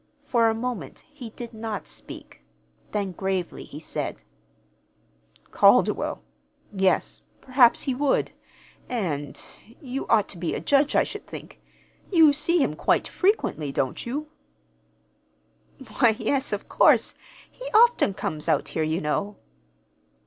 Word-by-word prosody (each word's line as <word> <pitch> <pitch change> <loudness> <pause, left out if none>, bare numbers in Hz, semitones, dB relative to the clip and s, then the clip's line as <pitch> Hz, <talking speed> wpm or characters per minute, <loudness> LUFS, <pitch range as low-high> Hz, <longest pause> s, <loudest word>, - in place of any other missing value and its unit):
For 230 -2 +2
a 220 - 0
moment 245 -1 -5
he 255 -6 -9
did 235 +1 -9
not 220 -2 -5
speak; 65 - -10 0.5
then, 200 -2 -2
gravely, 190 -1 -3
he 145 - -10
said: 160 - -5 1.3
"Calderwell? 60 - +3 0.5
Yes, 190 -1 +1 0.2
perhaps 255 -2 +4
he 270 - -1
would; 275 +2 +1 0.6
and 165 - -3 0.4
you 265 0 -5
ought 220 -3 +3
to 175 - -6
be 170 - -2
a - - -2
judge, 285 +1 +2
I - - +5
should - - -8
think. - - -10 0.5
You 320 -5 +6
see 310 +2 +2
him 150 - -1
quite - - +1
frequently, 365 - 0
don't 130 -1 -2
you?" 290 +6 -4 1.7
"Why, 235 -4 +5
yes, 275 0 -1
of - - -4
course. - - +4 0.4
He - - -11
often 470 - +4
comes 155 -4 -3
out - - +1
here, 160 - -2
you 155 +2 0
know." 200 +7 -2
230 Hz, 130 wpm, -25 LUFS, 185-275 Hz, 1.7 s, You